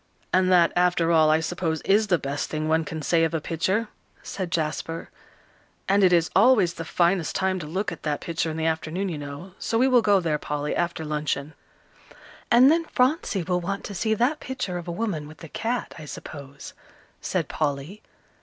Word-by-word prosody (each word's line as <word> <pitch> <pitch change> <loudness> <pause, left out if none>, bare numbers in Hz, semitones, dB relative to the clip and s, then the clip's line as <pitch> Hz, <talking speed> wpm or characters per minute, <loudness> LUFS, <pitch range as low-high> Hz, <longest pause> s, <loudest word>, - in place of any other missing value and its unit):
"And 185 0 +3
that, 175 -2 +5
after 175 -1 +2
all, 160 -2 +5
I 155 +1 +3
suppose 160 -1 -2
is 210 +2 +3
the 180 -3 +3
best 140 -1 -3
thing 155 0 -2
one 160 +1 +2
can 160 -1 -5
say 165 +2 +3
of 165 0 0
a - - +1
picture," 185 +8 -1 0.4
said 185 -3 -5
Jasper. 165 0 -3 0.8
"And 200 +1 +3
it 185 - +6
is 170 -2 +3
always 200 -4 +5
the 165 - -6
finest 170 0 +1
time 190 0 0
to 150 - -7
look 190 +7 -2
at - - -8
that 150 -2 -2
picture 165 -1 -2
in 160 - -4
the 160 - -1
afternoon, 160 +4 -1
you 160 -4 -4
know, 145 +6 -8
so 225 - -1
we 255 +3 +4
will 250 -2 +5
go 205 -3 +4
there, 160 -4 -1
Polly, 150 0 -3
after 170 -2 -2
luncheon." 150 -1 -2 1.0
"And 255 +4 +7
then 330 +1 +2
Phronsie 255 - +1
will 180 +1 0
want 195 +3 -3
to 205 - -6
see 220 +3 0
that 255 +8 +1
picture 250 -9 -4
of 175 - -10
a - - -2
woman 170 -6 -3
with 155 +2 -13
a - - -7
cat, 235 +8 -3
I 155 - -8
suppose," 140 -1 -9 0.5
said - - -1
Polly. 150 +6 -3
170 Hz, 200 wpm, -25 LUFS, 155-195 Hz, 1.0 s, And